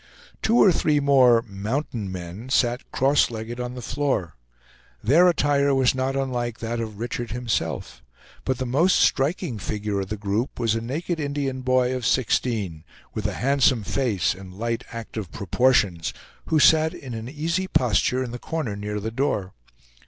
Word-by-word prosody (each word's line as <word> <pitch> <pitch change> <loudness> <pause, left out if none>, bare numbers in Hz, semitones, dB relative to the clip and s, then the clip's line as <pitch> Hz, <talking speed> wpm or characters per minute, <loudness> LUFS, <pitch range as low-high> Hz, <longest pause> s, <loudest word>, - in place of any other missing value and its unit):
Two 230 +2 +3
or 200 - +7
three 150 -3 +2
more 130 -5 +5
"mountain 110 0 -4
men" 90 +6 -7
sat 125 -1 +1
cross 140 +2 +3
legged 115 +1 -6
on 125 0 -4
the 125 - -7
floor. 130 - -1 0.7
Their 155 +11 +5
attire 145 -4 +2
was 130 -1 +3
not 130 +1 -1
unlike 120 -4 -2
that 115 +1 -3
of 110 -3 -5
Richard 120 +1 -4
himself; 120 - -3 0.4
but 130 -1 -1
the 130 - -3
most 150 +10 +3
striking 140 - +1
figure 105 0 -2
of 95 -1 -4
the 110 - -3
group 105 +6 -2
was 115 -2 +1
a 115 - -1
naked 160 +8 -3
Indian 140 -3 -2
boy 130 0 +2
of 125 - -4
sixteen, 105 -9 0 0.3
with 105 -1 -2
a 105 - -3
handsome 130 -2 +2
face, 110 -4 0
and 95 0 -11
light, 115 +2 -2
active 110 -5 -6
proportions, 100 -5 +1 0.3
who 155 - +3
sat 160 +1 +5
in 130 -3 -8
an 115 +1 -6
easy 165 +6 -2
posture 125 - +2
in 120 - -6
the 120 - -6
corner 155 -10 -3
near 105 +1 -4
the 110 +2 -4
door. 110 -7 -1
125 Hz, 165 wpm, -24 LUFS, 110-135 Hz, 0.7 s, or